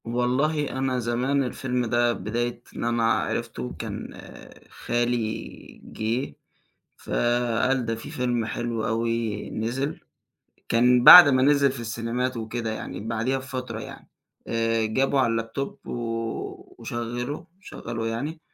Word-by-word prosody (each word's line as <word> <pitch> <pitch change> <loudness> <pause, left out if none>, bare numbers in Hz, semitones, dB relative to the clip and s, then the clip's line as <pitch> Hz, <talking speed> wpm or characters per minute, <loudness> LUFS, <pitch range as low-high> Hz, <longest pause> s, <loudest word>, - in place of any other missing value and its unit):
والله 130 +6 0
أنا 130 -1 -1
زمان 125 +4 0
الفيلم 125 0 -2
ده 120 +1 +2
بداية 120 +4 -3
إن - - -4
أنا 120 0 +1
عرفته 60 -1 -3
كان - - -6 0.6
خالي 120 -2 -3
جه، 115 +5 -3 0.6
فقال 120 +1 0
ده 115 0 -1
في 115 - -9
فيلم 120 -2 -1
حلو 115 0 -3
أوي 115 -2 -1
نزل، 125 +6 -2 0.7
كان 125 +1 +4
بعد 180 -4 +12
ما 130 -2 +3
نزل 140 -1 +4
في 130 - -7
السينمات 115 +2 -2
وكده 115 0 -3
يعني 90 -4 -6
بعديها 115 +4 0
بفترة 130 -3 -5
يعني - - -10 0.4
آآ 115 -1 +1
جابه 135 +5 +1
على 115 -3 +1
الLaptop 135 +5 -6
و - - -5 0.9
وشغّله 120 +4 -4
شغّله 115 -10 -6
يعني 145 +8 -4
120 Hz, 125 wpm, -25 LUFS, 115-130 Hz, 0.9 s, بعد